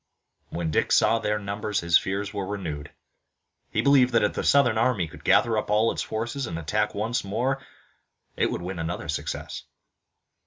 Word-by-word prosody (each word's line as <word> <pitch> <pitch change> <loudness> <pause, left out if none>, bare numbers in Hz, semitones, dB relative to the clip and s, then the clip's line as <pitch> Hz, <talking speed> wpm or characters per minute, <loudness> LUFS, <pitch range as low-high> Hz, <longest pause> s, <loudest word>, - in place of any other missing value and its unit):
When 85 -2 -3
Dick - - +1
saw 115 - +4
their 105 -1 0
numbers 105 0 -3
his 85 -1 +2
fears 100 +2 +1
were 100 -2 -3
renewed. 80 -8 -5 0.8
He - - 0
believed 130 -3 +5
that 115 - +4
if 105 - +1
the - - -3
Southern 125 -6 +4
army 110 -8 +1
could 80 - -14
gather 115 -2 +3
up - - -6
all 110 +2 +3
its - - -3
forces 120 +4 -3
and 80 - -4
attack 105 +7 -1
once 110 +4 -1
more 125 +7 -1 0.7
it - - +1
would 85 - -4
win 90 -1 -5
another 80 +1 -4
success. 75 - -4
105 Hz, 180 wpm, -25 LUFS, 90-115 Hz, 0.8 s, believed